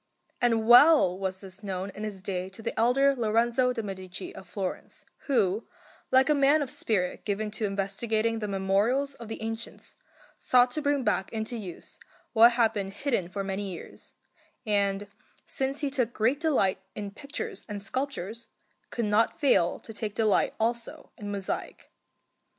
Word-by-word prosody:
And 230 -2 +2
well 245 - +7
was 190 0 -4
this 190 0 -10
known 195 -1 -4
in 210 - -8
his 200 -3 -5
day 185 -2 -3
to 210 +4 -12
the - - -2
elder 270 +5 +3
Lorenzo 235 +2 +2
de' 230 -3 -3
Medici 190 -2 -6
of 190 - -12
Florence, 195 -3 -5 0.2
who, 220 -6 +1 0.4
like 260 0 +5
a 300 - +4
man 285 +1 +4
of 265 - -5
spirit 185 -5 -1
given 210 +1 -2
to 215 +1 -2
investigating 215 +3 -1
the 210 - -3
memorials 205 +8 +1
of 235 -4 -10
the 225 - -6
ancients, 225 +1 -6 0.5
sought 245 0 +4
to 305 - -2
bring 285 -2 +1
back 210 -3 0
into 220 +1 -3
use 190 -7 -8 0.3
what 235 +1 +7
had 230 -2 +3
been 200 -3 -3
hidden 200 -4 -2
for 195 +1 -4
many 195 +1 -3
years, 170 - -10 0.5
and, 200 -1 +1 0.4
since 270 +2 -2
he 285 -2 -1
took 250 -4 0
great 240 +6 +1
delight 280 - +2 0.2
in 205 -1 -5
pictures 315 - -6
and 205 -1 -5
sculptures, 235 -3 -4 0.4
could 235 - -2
not 210 +9 +2
fail 255 - +3
to 225 - -10
take 210 -1 -4
delight 215 -3 +2
also 230 +1 -2
in 205 -2 -7
mosaic. 200 -1 -4
220 Hz, 165 wpm, -28 LUFS, 195-250 Hz, 0.5 s, well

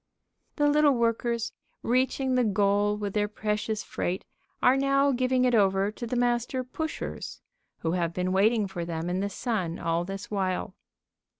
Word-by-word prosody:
The 295 -1 +2
little 290 -1 +4
workers, 235 0 0 0.3
reaching 260 +2 +1
the 250 -1 +3
goal 205 0 +2
with 205 -2 -4
their 210 -1 +1
precious 210 0 -2
freight, 180 +2 -3 0.3
are 250 - +5
now 275 +1 +3
giving 255 0 +2
it 250 - +2
over 195 -2 +3
to 235 +2 -6
the 250 - -2
Master 245 +1 0
Pushers, 315 +5 -5 0.4
who 160 - 0
have 170 -2 0
been 180 +1 -1
waiting 210 +3 +3
for 185 -3 -5
them 170 0 -3
in 180 - 0
the 200 +1 -1
sun 195 -6 -2
all 165 +1 0
this 195 +3 -7
while. 190 -2 -1
215 Hz, 165 wpm, -27 LUFS, 190-250 Hz, 0.4 s, are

